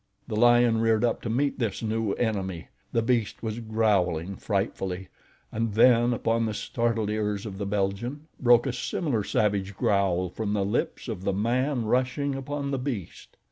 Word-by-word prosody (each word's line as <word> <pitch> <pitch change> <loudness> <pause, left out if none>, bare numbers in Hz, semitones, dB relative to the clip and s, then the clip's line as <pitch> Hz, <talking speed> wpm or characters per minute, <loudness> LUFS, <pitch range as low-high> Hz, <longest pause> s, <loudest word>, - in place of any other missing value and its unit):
The 110 - -3
lion 120 0 +5
reared 115 0 +2
up 115 - 0
to 115 - -4
meet 140 +5 0
this 115 -3 -2
new 110 -1 0
enemy. 95 -7 -2 0.2
The 115 - +1
beast 115 -3 0
was 110 0 -3
growling 100 -6 +1
frightfully, 95 -2 -2 0.4
and 110 -2 -2
then 120 +1 +5
upon 115 -1 +1
the 110 - -3
startled 115 -3 -1
ears 105 -1 -1
of 100 -2 -7
the 100 - -2
Belgian, 105 +9 -2
broke 120 -2 +5
a 135 - -1
similar 125 - -1
savage 100 -2 0
growl 95 -3 +2
from 105 +2 -3
the 100 -2 +1
lips 105 +6 -2
of 105 -6 -5
the 100 - 0
man 120 +5 0
rushing 130 +4 0
upon 140 +1 -4
the 135 - -1
beast. 125 - -6
110 Hz, 170 wpm, -27 LUFS, 100-120 Hz, 0.4 s, lion